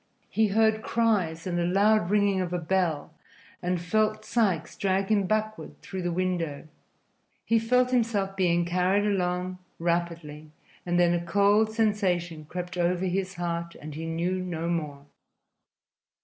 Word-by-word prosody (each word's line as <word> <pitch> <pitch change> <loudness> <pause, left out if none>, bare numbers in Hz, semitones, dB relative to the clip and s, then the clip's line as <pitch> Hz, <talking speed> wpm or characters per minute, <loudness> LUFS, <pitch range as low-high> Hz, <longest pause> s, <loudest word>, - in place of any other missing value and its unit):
He 220 0 +3
heard 220 +1 +2
cries 205 -9 0
and 175 -2 -1
the - - +1
loud 200 +2 +3
ringing 200 -2 +2
of 180 -1 -3
a 180 - 0
bell 170 -3 -1 0.5
and 180 0 -1
felt 215 +4 0
Sikes 190 -9 0
drag 195 0 0
him 200 -3 +2
backward 215 +1 -2
through 190 -1 -5
the 175 0 -1
window. 170 -5 -2 0.8
He 230 0 +3
felt 250 +3 +2
himself 220 -6 0
being 175 -2 +2
carried 180 +3 +1
along 180 -2 -1 0.2
rapidly, 170 -3 -2 0.4
and 175 0 +1
then 175 0 +4
a 175 0 -1
cold 205 +5 +3
sensation 185 -8 0
crept 180 +3 -6
over 175 +1 +1
his 190 +1 -2
heart 170 -1 -3
and 150 0 -8
he 160 +2 -5
knew 170 +3 -1
no 170 -2 -3
more. 150 -5 -3
180 Hz, 150 wpm, -27 LUFS, 170-205 Hz, 0.8 s, then